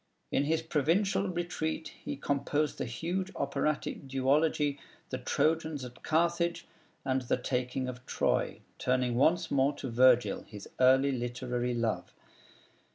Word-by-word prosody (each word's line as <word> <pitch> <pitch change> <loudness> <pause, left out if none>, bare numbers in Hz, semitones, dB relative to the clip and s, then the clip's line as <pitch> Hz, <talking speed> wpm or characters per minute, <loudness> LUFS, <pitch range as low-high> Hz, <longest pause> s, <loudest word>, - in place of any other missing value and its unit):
In 140 - +2
his 160 +2 +1
provincial 170 +6 +1
retreat 170 -2 -3
he - - -3
composed 140 +2 -1
the - - -1
huge 175 +10 -3
operatic 140 0 -1
duology 145 +2 +2 0.3
'The 130 - -2
Trojans 155 +1 0
at 125 0 -11
Carthage,' 170 +1 +1 0.4
and 130 0 +1
'The 125 - 0
Taking 125 +1 -2
of 125 0 -6
Troy,' - - 0 0.2
turning 125 -1 +1
once 165 +7 +2
more 140 +1 +3
to 135 -3 -6
Virgil, 125 -3 +4
his 105 -1 -10
early 130 +2 +5
literary 125 0 -2
love. 115 -2 -2
140 Hz, 130 wpm, -31 LUFS, 125-160 Hz, 0.4 s, early